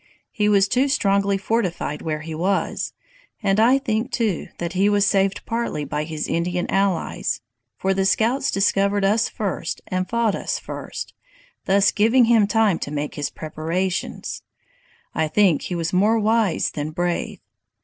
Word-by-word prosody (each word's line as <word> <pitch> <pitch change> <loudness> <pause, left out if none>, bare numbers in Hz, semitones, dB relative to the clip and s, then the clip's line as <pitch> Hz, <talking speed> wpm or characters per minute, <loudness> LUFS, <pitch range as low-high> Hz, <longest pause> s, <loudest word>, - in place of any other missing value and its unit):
He 210 -1 +1
was 200 -1 +4
too 255 +6 +2
strongly 200 -7 +2
fortified 190 -7 -2
where 155 -1 -3
he 160 0 -6
was, 185 +5 -1 0.5
and 195 0 +2
I 245 +4 +5
think, 240 -2 -2
too, 220 -9 -1
that 170 0 -4
he 195 +2 +3
was 205 -1 +3
saved 195 0 +1
partly 230 -10 -2
by 150 +2 -3
his 155 -1 -4
Indian 175 +1 -1
allies, 195 -3 0 0.4
for 190 0 +1
the 195 0 0
scouts 235 +8 +2
discovered 200 0 +2
us 215 +4 +2
first 190 -5 -3
and 185 0 -2
fought 230 -3 +1
us - - -2
first, - - -7 0.5
thus 200 +2 +4
giving 230 +4 +4
him 225 -3 +4
time 215 -4 +2
to - - -4
make 145 0 -3
his 145 - -3
preparations. 165 +4 -3 0.7
I 160 - 0
think 180 -2 +3
he 180 - -4
was 165 0 -2
more 210 +5 +3
wise 220 -3 +1
than 150 0 -4
brave! 175 +2 -2
195 Hz, 160 wpm, -22 LUFS, 175-220 Hz, 0.7 s, I